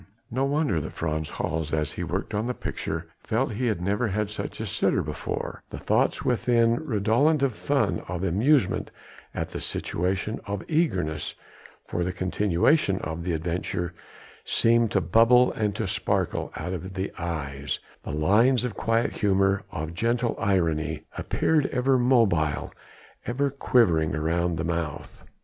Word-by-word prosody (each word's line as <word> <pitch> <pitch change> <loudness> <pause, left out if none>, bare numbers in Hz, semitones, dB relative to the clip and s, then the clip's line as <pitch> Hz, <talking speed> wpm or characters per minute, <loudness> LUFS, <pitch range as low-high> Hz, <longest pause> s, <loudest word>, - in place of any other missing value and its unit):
No 130 +3 +1
wonder 140 - +1
that 80 - -6
Frans 80 -1 -2
Hals 80 -1 -3
as 75 -2 -1
he - - -5
worked - - -3
on 105 +3 0
the 125 - -2
picture 80 +1 -4 0.2
felt 120 +4 0
he 125 +4 -1
had 110 -6 0
never 105 +5 +1
had 105 +1 -1
such 105 - -5
a - - -2
sitter - - +1
before; - - -4
the - - -7
thoughts - - +1
within 115 -1 +3
redolent 135 +5 +2
of 135 -3 +2
fun, - - 0
of 90 +1 -3
amusement 110 - +2 0.5
at - - -2
the - - -5
situation, 95 +5 -2
of 100 -1 -3
eagerness 95 - 0 0.5
for 85 - -2
the 90 - -1
continuation 95 - +2
of 80 +2 -4
the 90 0 -1
adventure 85 +1 -2 0.5
seemed 115 0 +3
to 100 - +1
bubble 115 +8 +5
and 105 -3 -1
to - - -2
sparkle - - -1
out 90 - -4
of 95 +2 -6
the 95 0 -3
eyes, 70 -5 -3 0.2
the - - -8
lines 105 - +3
of 125 -3 -2
quiet 115 +1 +1
humour, 95 -1 +2
of 80 0 -4
gentle 115 +5 0
irony, 80 -5 0
appeared 155 -3 +1
ever 130 +1 +2
mobile, 110 - +2 0.5
ever 135 +3 0
quivering 105 - +3
around 85 +2 0
the 80 - -1
mouth. 85 -3 -4
100 Hz, 155 wpm, -26 LUFS, 85-120 Hz, 0.5 s, bubble